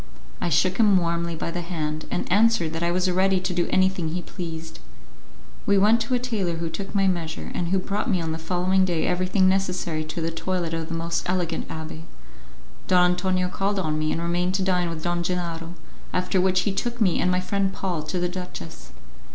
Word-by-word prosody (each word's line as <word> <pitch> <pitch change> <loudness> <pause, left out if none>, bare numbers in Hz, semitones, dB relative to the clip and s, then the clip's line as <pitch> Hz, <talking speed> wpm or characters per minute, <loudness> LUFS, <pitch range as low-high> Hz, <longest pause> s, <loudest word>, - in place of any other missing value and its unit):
I 175 - 0
shook 185 +4 +2
him 210 -4 +5
warmly 170 -1 0
by 165 - -3
the 175 - -3
hand, 155 -3 -3
and - - -1
answered 205 -6 +3
that 165 - -3
I 170 - +1
was 180 +1 +1
ready 190 +1 +3
to 185 0 -2
do 175 -1 +1
anything 185 -3 +2
he 175 +2 -3
pleased. 165 -2 -7 0.9
We 200 0 +5
went 215 +4 +5
to 255 - 0
a - - +3
tailor 220 -9 -1
who 165 0 -3
took 200 +3 -6
my 195 -1 +3
measure, 170 -3 -2
and 175 - -1
who 190 +3 +2
brought 205 +6 -2
me 185 -4 +2
on 165 -1 -2
the 160 - -3
following 180 +3 +2
day 175 -3 +1
everything 185 +2 +2
necessary 180 -4 0
to 155 +2 -5
the 165 0 -1
toilet 170 0 -2
of 165 -1 -2
the 165 - -4
most 165 +1 -2
elegant 175 -3 -1
abbé. 160 0 -6 0.9
Don 180 -1 +5
Antonio 185 0 +1
called 195 +2 -1
on 155 -5 0
me, 155 0 0
and 165 - -1
remained 175 +2 0
to 190 - +1
dine 180 -2 +1
with 160 -2 -6
Don 175 0 0
Gennaro, 170 -1 -3 0.4
after 180 +1 +1
which 185 0 +3
he 200 - 0
took 240 +4 -2
me 190 -6 +3
and 180 - +2
my 180 0 +2
friend 195 +1 0
Paul 185 -4 -2
to 155 +4 -3
the 180 - +1
duchess. 180 - -8
180 Hz, 215 wpm, -25 LUFS, 165-190 Hz, 0.9 s, him